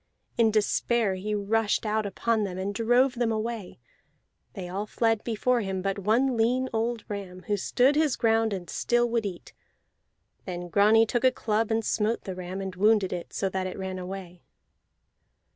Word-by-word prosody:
In 230 -2 +4
despair 220 0 +1
he 205 +3 -3
rushed 210 +2 0
out 215 0 0
upon 220 +2 0
them, 185 -3 -4
and 195 +2 -3
drove 245 +4 +3
them 240 -1 0
away; 220 -2 -4 0.8
they 185 -2 -6
all 195 +4 -4
fled 225 -1 +1
before 240 +2 +1
him 190 -2 -3
but 195 0 -1
one 235 +6 +2
lean 250 +3 +1
old 230 0 -1
ram, 190 -3 -6
who 205 - 0
stood 250 +8 +2
his 305 -3 +2
ground 225 -1 +2
and 185 -3 -4
still 240 +6 +1
would 230 -3 0
eat. 180 -3 -9 0.9
Then 175 -1 -5
Grani 215 +4 +5
took 240 +2 -1
a 260 - +6
club 225 -2 -1
and 225 -1 0
smote 220 +2 0
the 190 - -5
ram, 185 +1 -6
and 190 -1 -5
wounded 205 -1 +3
it, 175 -1 -6
so 195 - -1
that 185 0 -2
it 185 - -6
ran 190 -1 -4
away. 180 -1 -7
215 Hz, 175 wpm, -27 LUFS, 190-230 Hz, 0.9 s, a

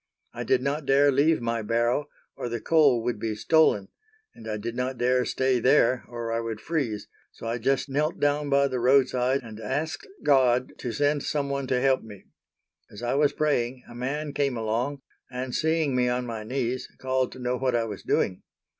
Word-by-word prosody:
I - - -4
did 130 -1 +2
not 140 +1 -2
dare 140 +1 +5
leave 145 +2 +3
my 115 -1 -1
barrow 120 +6 0 0.3
or 120 - -4
the 120 0 -3
coal 140 -5 +3
would 120 -2 -2
be 110 0 -2
stolen, 105 -6 +3 0.4
and 110 - -12
I 105 - -2
did 115 +3 -5
not 125 +1 -2
dare 125 +1 +2
stay 130 -1 +1
there 130 0 +3
or 120 -1 -5
I 115 - 0
would 115 -2 -4
freeze, 120 -7 -2 0.2
so - - -11
I 115 +1 -2
just 135 +4 +1
knelt 150 +4 -1
down 145 0 +1
by 140 0 +4
the 130 -2 -2
roadside 130 +1 +3
and 110 -2 -10
asked 160 - -3 0.2
God 130 -3 +3
to 125 - -3
send 145 +3 +1
some 140 -1 -2
one 140 -1 -2
to 130 -1 +1
help 135 0 +2
me. 105 -3 -12 0.7
As 105 +3 -11
I 120 - 0
was 145 +1 +3
praying 130 -4 -1
a - - -12
man 140 +5 -3
came 140 -3 0
along, 120 +5 -2 0.3
and 125 0 -5
seeing 160 -4 +1
me 125 -1 +2
on 125 0 -1
my 115 -2 -5
knees 125 +1 -2
called 130 -1 0
to - - -11
know 125 0 -1
what 130 -1 0
I 115 - +2
was 105 -3 -6
doing. 90 - 0
125 Hz, 200 wpm, -26 LUFS, 120-140 Hz, 0.7 s, dare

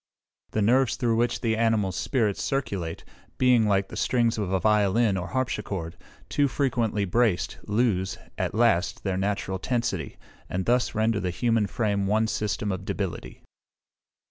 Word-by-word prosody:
The 110 - 0
nerves 125 +2 +3
through 115 -3 +1
which 120 +1 0
the 115 -2 +1
animal 110 -4 +1
spirits 105 +2 0
circulate 100 -12 -2 0.3
being, 125 -4 +4
like 100 -1 +1
the - - -8
strings 115 -3 +1
of 100 -3 -2
a 95 - +2
violin 105 +1 +3
or 90 0 -3
harpsichord, 100 -9 -3 0.3
too 145 -1 +2
frequently 120 -7 0
braced, 110 0 +1
lose, 105 -4 +1 0.2
at - - -2
last, 110 -6 +2
their 95 -2 -1
natural 95 -1 -2
tensity, 100 - -2 0.3
and 90 0 -2
thus 125 0 +1
render 110 0 +1
the 90 - -2
human 115 +3 +1
frame 100 -2 -1
one 110 +2 +2
system 105 -1 -2
of 95 0 -4
debility. 95 -2 -5
105 Hz, 150 wpm, -26 LUFS, 95-120 Hz, 0.3 s, being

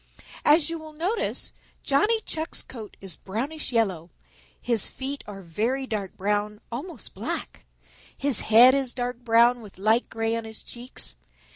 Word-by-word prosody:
"As 300 +1 +6
you 330 0 -3
will 310 -1 -10
notice, 360 +9 -1 0.3
Johnny 420 +12 +3
Chuck's 320 -3 -4
coat 220 -5 -9
is 190 -5 -3
brownish 265 - -4
yellow, 190 -8 +1 0.5
his 230 -4 +1
feet 275 +2 -5
are 195 -2 -8
very 230 +11 0
dark 210 -6 -3
brown, 210 +1 0
almost 275 - -6
black. - - -4 0.5
His 275 -4 +1
head 235 +4 +8
is 270 -3 0
dark 245 -1 -2
brown 240 0 +5
with 205 -4 -12
light 220 +5 +3
gray 225 0 0
on 230 - -2
his 220 0 -8
cheeks. 240 - -7
235 Hz, 150 wpm, -26 LUFS, 210-275 Hz, 0.5 s, head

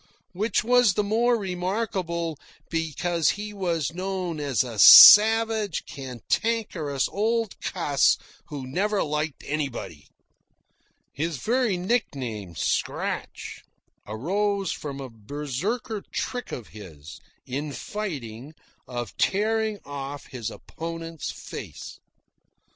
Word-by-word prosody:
Which 205 +4 0
was 245 -4 +4
the 210 - +1
more 230 +4 +2
remarkable, 180 -4 -3 0.3
because 165 0 0
he 210 0 -6
was 170 -7 -1
known 185 -3 -3
as 140 -5 +1
a 115 -4 -7
savage, 220 - +9
cantankerous 145 - -2
old 225 +1 -1
cuss 150 -7 +2 0.3
who 140 -3 -6
never 195 +10 0
liked 150 0 -3
anybody. 135 - -4 1.1
(His 160 +1 -2
very 235 - +1
nickname, 130 - -2
"Scratch," - - -3 0.5
arose 195 - -1
from 140 -2 -6
a 135 - -6
Berserker 150 - -4
trick 245 -1 -4
of 120 - -7
his, 80 -8 -11 0.3
in 145 +4 -4
fighting, 140 - -6 0.3
of 120 -1 -5
tearing 220 +1 +1
off 140 0 -6
his 120 -4 -4
opponent's 165 -1 -7
face.) - - -9
165 Hz, 100 wpm, -25 LUFS, 135-210 Hz, 1.1 s, savage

